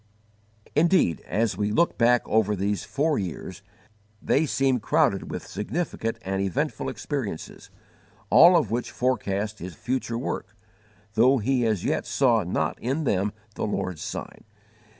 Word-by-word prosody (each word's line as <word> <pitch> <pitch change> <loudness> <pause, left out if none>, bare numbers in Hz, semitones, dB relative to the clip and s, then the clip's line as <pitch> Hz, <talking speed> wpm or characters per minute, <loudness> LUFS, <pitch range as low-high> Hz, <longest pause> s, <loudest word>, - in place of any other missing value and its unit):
Indeed, 160 - +3
as 110 0 0
we 105 0 0
look 170 +10 +2
back 120 +1 +3
over 105 -1 +2
these 100 -1 -1
four 150 +1 0
years, 95 +1 -6 0.6
they 150 +8 +1
seem 135 -2 +1
crowded - - +1
with - - -5
significant 115 - -3
and 95 0 -2
eventful 95 -3 -1
experiences, - - -5 0.6
all 175 +1 +8
of 120 - 0
which 120 +1 -1
forecast 105 -4 -1
his 90 0 -7
future 125 -2 -2
work, 110 -4 -4 0.6
though 125 +5 +5
he 125 +1 +1
as 105 -5 -1
yet - - -1
saw 120 -5 +3
not 90 -1 -2
in 135 +6 -1
them 100 -5 +1 0.2
the - - -3
Lord's 95 -5 -3
sign. - - -6
115 Hz, 140 wpm, -25 LUFS, 100-130 Hz, 0.6 s, all